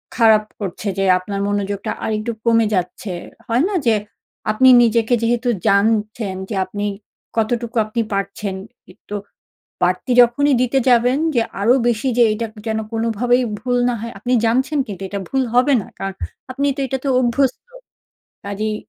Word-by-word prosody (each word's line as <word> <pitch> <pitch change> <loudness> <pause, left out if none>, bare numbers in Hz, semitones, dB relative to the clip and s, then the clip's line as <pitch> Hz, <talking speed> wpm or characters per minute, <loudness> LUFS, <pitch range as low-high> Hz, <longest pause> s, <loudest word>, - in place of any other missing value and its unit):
খারাপ 220 -2 +5 0.2
করছে 200 0 -5
যে 195 - +1
আপনার 195 +2 -5
মনোযোগটা 205 -1 -2
আরেকটু 215 +2 -2
কমে 230 -1 +4
যাচ্ছে। 180 +2 -3 0.4
হয় 235 +4 +2
না 410 - -2
যে, 230 -2 +4 0.6
আপনি 260 +5 +5
নিজেকে 230 0 +2
যেহেতু 240 +1 +1 0.2
জানছেন 210 0 +1
যে 215 - -3
আপনি 205 +1 -4 0.5
কতটুকু 230 +1 -1
আপনি 215 +2 -2
পারছেন, 195 0 -3 0.4
একটু 205 - -9 0.7
বাড়তি 180 +8 0
যখনই 275 +4 +3
দিতে 255 +2 +2
যাবেন 245 +2 +4 0.2
যে 235 - +4 0.2
আরো 230 +5 +5
বেশি 235 +2 0
যে 240 - +6
এটা 230 +2 -3 0.2
যেন 220 0 0
কোনোভাবেই 230 +2 +1 0.2
ভুল 245 0 0
না - - 0
হয়, 230 +1 -6
আপনি 250 - -1
জানছেন 260 +6 +1
কিন্তু 195 -3 -7
এটা 200 - -4
ভুল 270 -1 +1
হবে 255 +4 +4
না - - -11
কারণ 195 0 -3 0.4
আপনি 280 +2 -1
তো - - -7
এটাতে 265 +2 -3
অভ্যস্ত। 255 - 0 0.8
কাজেই 210 +2 -2
230 Hz, 150 wpm, -19 LUFS, 205-245 Hz, 0.8 s, যে